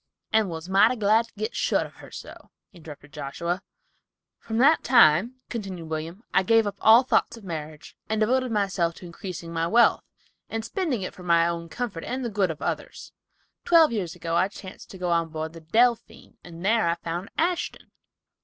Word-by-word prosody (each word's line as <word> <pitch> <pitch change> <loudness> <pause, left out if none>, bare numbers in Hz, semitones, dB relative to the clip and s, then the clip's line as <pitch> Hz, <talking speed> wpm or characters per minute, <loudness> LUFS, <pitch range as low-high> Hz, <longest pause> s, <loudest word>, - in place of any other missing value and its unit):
"And 220 -3 +3
was 165 0 -6
mighty 200 +6 +4
glad 220 +1 +2
to - - -27
get 215 +3 -4
shut - - +1
of - - -14
her - - -13
so," - - -11 0.2
interrupted 150 -4 -13
Joshua. 170 +5 -4 0.8
"From 225 - -5
that 275 +7 +4
time," 230 - +5
continued 190 -8 -6
William, 160 +6 -5
"I - - +5
gave 225 +3 +3
up 200 -1 -4
all 225 +3 +7
thoughts 240 -2 +1
of 225 - -14
marriage, 155 -4 -7
and 220 0 0
devoted 255 +3 +1
myself 195 -5 0
to - - -12
increasing 170 -1 -8
my 165 0 0
wealth, 235 +6 +4 0.5
and 225 0 -4
spending 310 - -2
it - - -5
for - - -13
my 170 -1 +3
own 170 -1 -4
comfort 215 -5 -5
and 255 0 -4
the 235 - -3
good 195 -3 +1
of 160 - -6
others. - - -5 0.5
Twelve 330 -4 +5
years 190 -6 -3
ago 165 -1 -3
I 185 - +3
chanced 195 -1 -11
to 190 - -10
go 180 -1 -2
on 165 -1 +1
board 160 0 -5
the 165 - -11
Delphine, 230 +8 0
and 170 +1 -10
there 220 -2 +3
I 170 - +1
found 170 +2 -5
Ashton." 350 +2 -2
190 Hz, 190 wpm, -25 LUFS, 170-225 Hz, 0.8 s, all